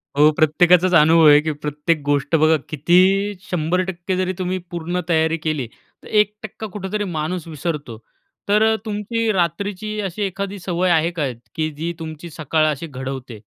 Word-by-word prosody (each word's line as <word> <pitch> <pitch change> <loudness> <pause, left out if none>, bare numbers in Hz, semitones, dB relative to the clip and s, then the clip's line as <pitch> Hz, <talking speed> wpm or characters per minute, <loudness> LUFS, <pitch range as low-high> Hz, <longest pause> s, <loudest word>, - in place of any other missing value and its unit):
हो. 150 +2 +6
प्रत्येकाचाच 175 +3 +4
अनुभव 160 +1 +6
आहे, 145 0 +8
की 155 0 -2
प्रत्येक 150 +2 -2
गोष्ट 145 +2 +1
बघा 155 +1 +4
किती 165 +4 +3 0.5
100% 180 +2 -1
जरी 185 0 0
तुम्ही 185 0 -1
पूर्ण 175 +1 -3
तयारी 160 0 +2
केली 155 -6 -2 0.4
तर - - -12
1% 210 0 -1
कुठेतरी 205 +1 -3
माणूस 165 +2 -3
विसरतो. 150 -6 -5 0.5
तर 220 +2 +4
तुमची 220 +1 -1
रात्रीची 200 +4 -2
अशी 195 +1 -5
एखादी 200 +1 -4
सवय 180 0 -1
आहे 165 +1 +2
का 150 -6 -2 0.3
की 155 0 -1
जी 170 +2 -3
तुमची 160 +1 -7
सकाळ 155 +1 0
अशी 150 +3 -5
घडवते? 130 -4 -7
170 Hz, 150 wpm, -20 LUFS, 155-185 Hz, 0.5 s, आहे